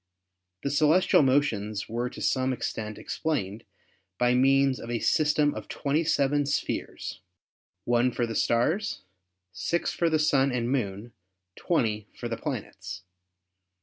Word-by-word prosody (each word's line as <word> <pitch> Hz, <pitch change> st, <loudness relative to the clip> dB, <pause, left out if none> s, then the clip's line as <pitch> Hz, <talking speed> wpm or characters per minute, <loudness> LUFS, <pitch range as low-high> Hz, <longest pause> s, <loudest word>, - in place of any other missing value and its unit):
The 140 Hz, -, -1 dB
celestial 155 Hz, +5 st, +4 dB
motions 115 Hz, -7 st, +1 dB
were 120 Hz, +2 st, -2 dB
to -, -, -8 dB
some 130 Hz, 0 st, +1 dB
extent 110 Hz, -3 st, -4 dB
explained 115 Hz, -9 st, -3 dB, 0.5 s
by 125 Hz, 0 st, +3 dB
means 135 Hz, +1 st, +3 dB
of 115 Hz, -, -8 dB
a 120 Hz, -, 0 dB
system 150 Hz, +3 st, +2 dB
of -, -, -7 dB
27 145 Hz, -1 st, +1 dB
spheres, 145 Hz, -, -3 dB, 0.6 s
1 120 Hz, +2 st, +2 dB
for 120 Hz, -, -1 dB
the 115 Hz, -, -5 dB
stars, 155 Hz, -, 0 dB, 0.5 s
6 170 Hz, +10 st, -1 dB
for 170 Hz, -, +1 dB
the 160 Hz, -, +2 dB
Sun 140 Hz, -3 st, +3 dB
and 120 Hz, 0 st, -1 dB
Moon, 110 Hz, -3 st, -2 dB, 0.4 s
20 110 Hz, -, 0 dB
for 120 Hz, -, -5 dB
the 115 Hz, -, -2 dB
planets. 100 Hz, -, -6 dB
130 Hz, 130 wpm, -27 LUFS, 115-145 Hz, 0.6 s, celestial